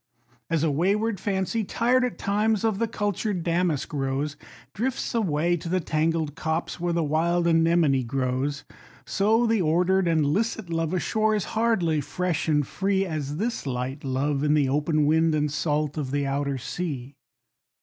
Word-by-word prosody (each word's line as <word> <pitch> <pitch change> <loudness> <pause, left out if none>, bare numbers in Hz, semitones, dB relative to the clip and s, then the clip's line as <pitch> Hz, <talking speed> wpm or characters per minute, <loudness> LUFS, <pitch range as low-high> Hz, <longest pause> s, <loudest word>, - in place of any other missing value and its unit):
As 165 -2 +1
a 160 - +2
wayward 200 +7 +1
Fancy, 195 +3 -1
tired 245 +5 +2
at 250 - -2
times, 210 +1 +1
of 220 -3 +1
the 230 - +1
cultured 205 -3 -2
Damask 170 -5 0
Rose, 140 +1 -1 0.4
Drifts 260 +5 -2
away 175 -6 +1
to 170 +1 -7
the 185 +2 +1
tangled 160 -2 0
copse, 160 +3 -3
where 175 0 -1
the 170 -1 +1
wild 170 +3 +1
Anemone 165 -4 +3
grows; 130 +3 -2 0.4
So 220 +4 +2
the 225 -3 +2
ordered 180 +3 +2
and 160 -3 +2
licit 205 +4 -1
love 165 +1 -1
ashore, 215 +4 +1
is 205 - 0
hardly 205 -9 +1
fresh 175 +3 -2
and 150 -2 +2
free 195 +5 0
As 150 -4 -4
this 225 -5 -2
light 130 +2 -3
love 140 +2 -1
in 150 0 +3
the 145 -3 +3
open 150 +2 +1
wind 160 +1 +3
and 150 -1 0
salt 150 0 -1
of 140 -3 -3
the 140 +1 -1
outer 140 0 -1
sea. 140 -2 -5
165 Hz, 165 wpm, -25 LUFS, 145-195 Hz, 0.4 s, Anemone